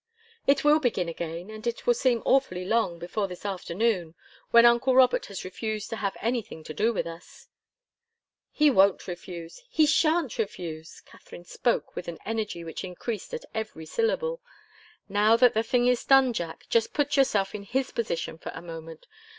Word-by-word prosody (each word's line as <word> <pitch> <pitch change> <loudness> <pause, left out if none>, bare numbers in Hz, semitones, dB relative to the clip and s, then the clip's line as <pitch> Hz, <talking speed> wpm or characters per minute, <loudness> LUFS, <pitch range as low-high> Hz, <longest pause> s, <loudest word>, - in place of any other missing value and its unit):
"It 275 - +4
will 300 +1 +5
begin 230 - 0
again, 170 +3 -5
and 215 +2 -7
it 235 - -3
will 240 - +5
seem 240 -1 +1
awfully 185 -10 +2
long, 220 -5 +1
before 195 +4 -3
this 180 +1 -10
afternoon 185 -2 -1 0.3
when 235 0 +7
uncle 240 +2 +4
Robert 255 -1 +4
has 200 -2 -7
refused 215 +3 -4
to 225 - -3
have 200 -3 -2
anything 230 -8 -3
to 155 - -7
do 215 +9 +2
with 220 - -2
us." 165 +1 -11 1.0
"He 300 -1 +3
won't 195 -4 +3
refuse 175 - -8
he 315 -8 +4
shan't 310 -2 +2
refuse!" 165 -7 -5
Katharine 175 - -14
spoke 240 +6 -1
with - - -6
an 170 -1 -5
energy 215 -6 -3
which 165 -1 -6
increased 190 +4 -5
at 480 +1 -7
every 215 -8 -5
syllable. 485 - -1 0.7
"Now 205 +3 +4
that 245 0 +5
the 220 - +2
thing 245 +2 +1
is 250 -1 +2
done, 270 -2 +5
Jack, 170 -6 -5
just 230 -1 +1
put 290 -1 +1
yourself 210 -8 +2
in 210 - -5
his 255 +6 -2
position 170 -7 -3
for - - -6
a - - -7
moment. 165 -1 -9
215 Hz, 175 wpm, -27 LUFS, 175-245 Hz, 1.0 s, when